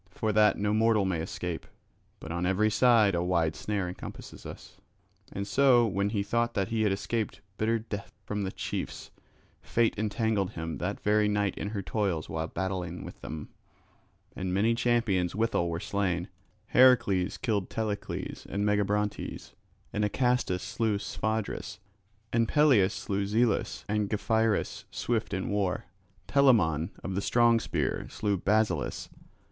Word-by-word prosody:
For 110 +4 -2
that 105 -1 +5
no 105 +1 0
mortal 110 -2 +3
may 90 -4 0
escape; 85 +1 -4 0.5
but 80 - -8
on 85 +1 -2
every 105 +3 +2
side 115 -4 +5
a 85 - +1
wide 85 -3 +1
snare 100 -3 -2
encompasses 90 - -8
us. - - -11 0.5
And 100 - -3
so, 125 +2 +5
when 100 -1 0
he 105 -2 -1
thought 115 +3 0
that 95 -3 0
he 115 -1 0
had 105 -2 +3
escaped 105 +2 -2 0.2
bitter 115 +1 +2
death 105 -2 -6
from 105 0 -2
the 95 -1 -2
chiefs, - - -5 0.5
fate 115 -1 +1
entangled 110 -2 0
him 80 0 -4
that 95 +3 -2
very 105 0 +3
night 105 -1 0
in 100 - -4
her 100 -2 -4
toils 95 -8 -1
while 80 0 -3
battling 90 -1 -3
with - - -10
them; 75 -1 -6 0.9
and 95 -1 -3
many 105 +5 +3
champions 115 -7 +1
withal 110 -6 +1
were 85 0 -2
slain; 95 -3 -1 0.4
Heracles 100 -8 +4
killed 105 -5 -1
Telecles 110 -2 -4
and 100 +1 -1
Megabrontes, 105 0 -1 0.4
and 105 - 0
Acastus 125 -4 +1
slew 110 -3 0
Sphodris; 110 +1 -3 0.6
and 115 -1 +3
Peleus 130 -11 +4
slew 100 0 -2
Zelus 110 +1 +1
and 105 -1 0
Gephyrus 110 0 0
swift 115 -3 -2
in 95 -1 -2
war. 100 -3 -1 0.4
Telamon 95 - +4
of 95 - -3
the 95 - -1
strong 115 +2 +4
spear - - -2
slew 105 -2 -1
Basileus. 100 -3 0
105 Hz, 150 wpm, -29 LUFS, 95-110 Hz, 0.9 s, that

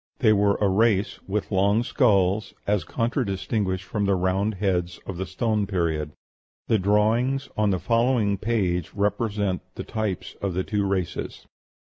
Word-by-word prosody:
They 110 -6 +4
were 100 -1 +3
a 105 - +1
race 100 0 +2
with 105 +2 -2
long 100 +4 +3
skulls, 105 -5 +2
as 100 -3 +1
contradistinguished 100 - -1
from 100 +1 -1
the 100 -1 +2
round 95 +3 0
heads 90 -3 -1
of 95 - -6
the 95 0 -3
Stone 105 +2 0
Period. 80 -6 -1 0.6
The 110 - +3
drawings 115 +7 +2
on 105 -1 +2
the 95 - +2
following 115 -2 +1
page 95 -7 -1
represent 100 -1 0
the - - -5
types 110 -5 -3
of 95 -3 -2
the 95 - 0
two 100 -1 -1
races. 95 -3 -3
100 Hz, 150 wpm, -25 LUFS, 95-110 Hz, 0.6 s, They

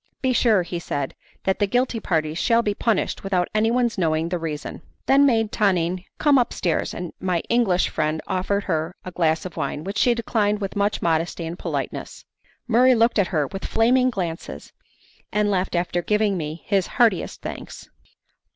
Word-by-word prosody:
"Be 260 -1 +2
sure," 220 -6 +3
said 170 -5 -3
he, - - -33
"that 190 - 0
the 205 - +2
guilty 245 +2 0
parties 160 -4 -1
shall 230 0 +3
be 210 - 0
punished 215 -1 -1
without 185 -3 0
anyone's 230 +1 +1
knowing 160 -1 +1
the 175 0 -2
reason" 155 -3 -5
I - - -18 0.2
then 280 +1 +5
made 225 -4 +2
Tonine 185 -3 +1
come 290 -3 +4
upstairs, 185 -8 -1
and 175 -1 -6
my 180 -3 0
English 225 -7 +2
friend 155 +1 -1
offered 200 +2 -1
her 165 -1 -2
a 185 - -5
glass 160 -2 +1
of 180 - -7
wine, 150 - -3
which 200 +3 -3
she 245 -2 +4
declined 210 -3 0
with 195 -2 -4
much 205 +1 0
modesty 165 +1 0
and 165 +2 -6
politeness. - - -5 0.4
Murray 250 +2 +5
looked 230 -1 +3
at 195 - +3
her 155 -4 0
with 195 +8 -7
flaming 250 +3 +3
glances, 175 -8 -5 0.6
and 210 0 +1
left 185 -1 0
after 175 0 0
giving 210 +1 +1
me 155 -1 -5
his 195 -3 +1
heartiest 230 -8 +2
thanks. - - -7
195 Hz, 180 wpm, -23 LUFS, 170-225 Hz, 0.6 s, then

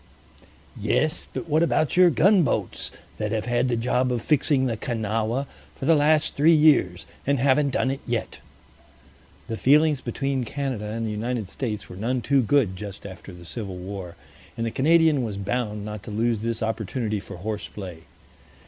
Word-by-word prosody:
"Yes; 155 +2 0
but - - -5
what 155 +1 +2
about 155 -3 +2
your 180 0 +7
gunboats 175 - +2 0.3
that 105 -1 -2
have 110 -1 -1
had 120 +1 +1
the 120 - +1
job 125 +2 +1
of 120 -3 -2
fixing 140 -2 +2
the 120 -3 0
Kanawha 115 +2 -1 0.3
for - - -5
the 165 - +5
last 155 0 +3
three 160 +4 +5
years, 140 - +4 0.2
and 140 0 +3
haven't 140 +3 +3
done 130 0 0
it 135 - -4
yet?" 120 -2 -3 1.1
The 115 - -4
feelings 150 +2 +4
between 135 +2 -2
Canada 130 -3 -3
and 115 +2 -3
the 110 - -2
United 110 -1 -3
States 110 -6 -4
were 90 - -10
none 120 +5 -1
too 140 -1 +3
good 115 -5 +2
just 100 +1 -8
after 95 0 -9
the 90 -1 -12
Civil 95 +2 -6
War, 90 -1 -7 0.4
and 115 - -1
the 115 - -2
Canadian 160 +1 +4
was 110 -4 -3
bound 105 0 -2
not 105 -1 -6
to 110 - -10
lose 110 +1 0
this 115 0 -2
opportunity 110 0 -2
for 95 - -9
horse 105 +3 -4
play. 90 -5 -8
120 Hz, 175 wpm, -25 LUFS, 105-140 Hz, 1.1 s, your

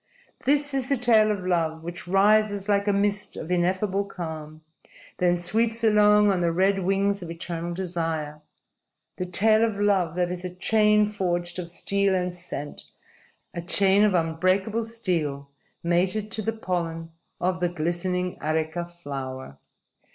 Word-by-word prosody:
_ 275 - +2
_This 290 -1 +1
is 265 -2 -1
the 275 - +2
tale 225 -3 +4
of 200 -3 -2
love 165 -3 0
which 175 +1 -7
rises 205 +1 +3
like 200 0 +1
a - - +4
mist 200 0 0
of 160 - -6
ineffable 185 +3 +1
calm, 160 -5 -8 0.6
then 175 -1 +3
sweeps 225 +6 0
along 210 -1 +5
on 185 -2 0
the 170 -1 +2
red 190 +3 +2
wings 195 +1 0
of 175 - -7
eternal 170 0 -5
desire 165 -4 -3 0.8
the 180 - -3
tale 215 +4 +4
of 220 -3 -1
love 190 -5 +1
that 180 -1 0
is 180 0 -5
a 180 - -3
chain 210 +2 +4
forged 175 -4 -2
of 170 -1 -5
steel 200 +2 0
and 180 -1 -1
scent, 170 -5 -7 0.7
a 170 - -4
chain 195 +3 +4
of 205 -3 +3
unbreakable 185 +7 0
steel 160 -11 -3 0.3
mated 185 +5 0
to 220 - -1
the 225 - -1
pollen 170 -6 -4 0.3
of 180 0 -1
the 175 -1 +1
glistening 175 +2 -2
areka 160 +2 -1
flower. 135 - -7
180 Hz, 155 wpm, -25 LUFS, 170-205 Hz, 0.8 s, along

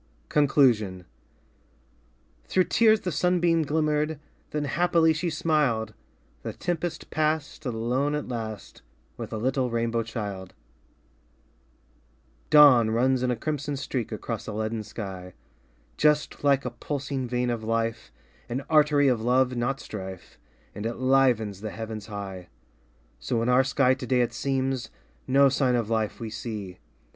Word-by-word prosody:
Conclusion 120 -11 +3 1.4
Through 185 - +2
tears 220 +2 +4
the 180 - -2
sunbeam 175 +1 +2
glimmered 150 0 0 0.3
Then 150 -1 -2
happily 165 +2 +3
she 170 +3 -2
smiled 145 -9 0 0.5
The - - -5
tempest 175 -2 -4
passed 155 -1 -1
Alone 125 +5 0
at 150 - -4
last 110 -4 -6 0.3
With - - -7
a - - -3
little 130 +2 0
rainbow 115 0 0
child. 105 -5 -5
DAY - - -24 1.8
DREAMS - - -36
Dawn 140 -7 +7
runs 125 +3 +2
in 125 - 0
a 125 - +1
crimson 145 +2 -3
streak 130 -4 -3
Across - - -5
a - - -4
leaden 110 +1 -2
sky 95 -4 -8 0.3
— - - -36
Just 150 -1 +1
like 140 -2 +3
a 125 - -2
pulsing 135 +1 -4
vein 125 0 0
of 115 -2 -3
life 115 0 -2 0.4
An 125 +3 -2
artery 150 -2 +4
of 125 -4 +2
love 125 +2 +2
not 120 +3 -1
strife 95 -3 -8 0.3
And 105 +2 -4
it 115 - -4
livens 125 -6 +2
the 110 - -4
heavens 110 0 -6
high. 100 -4 -7 0.7
So 115 - -1
in 120 - 0
our 125 +1 +5
sky 130 -1 +3
today 130 -1 0
it 120 -1 0
seems, 135 0 -1 0.4
No 140 +1 +5
sign 130 -2 +2
of 115 -2 -1
life 110 -2 -1
we 115 -2 -5
see. 105 -5 -6
125 Hz, 145 wpm, -26 LUFS, 110-145 Hz, 1.8 s, Dawn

